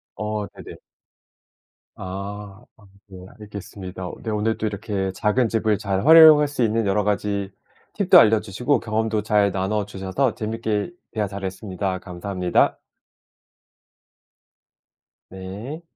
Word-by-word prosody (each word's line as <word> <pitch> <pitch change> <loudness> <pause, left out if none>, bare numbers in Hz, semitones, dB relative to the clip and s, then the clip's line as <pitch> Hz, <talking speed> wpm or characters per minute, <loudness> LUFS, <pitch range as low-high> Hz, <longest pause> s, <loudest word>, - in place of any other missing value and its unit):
어 105 0 -3
네네. - - -12 1.2
아. 100 +2 -7
아 110 - -21 0.3
네 90 -1 -11
알겠습니다. 95 -3 -8
네 110 - -4
오늘도 110 +1 -1
이렇게 100 -2 -3
작은 110 +5 +1
집을 110 -2 +1
잘 95 +1 -2
활용할 155 -2 +8
수 140 -3 -4
있는 115 -1 +1
여러 100 +1 +1
가지 100 -1 -1 0.4
팁도 - - +6
알려주시고 110 +5 +2
경험도 110 -1 -1
잘 105 -1 +2
나눠 100 +2 -1
주셔서 100 +5 -2
재밌게 110 +2 -3 0.2
대화 110 -2 -1
잘 100 0 -6
했습니다. 95 -1 -4
감사합니다. 90 0 -1 2.5
네. 100 - -8
105 Hz, 245 characters per minute, -22 LUFS, 95-110 Hz, 2.5 s, 활용할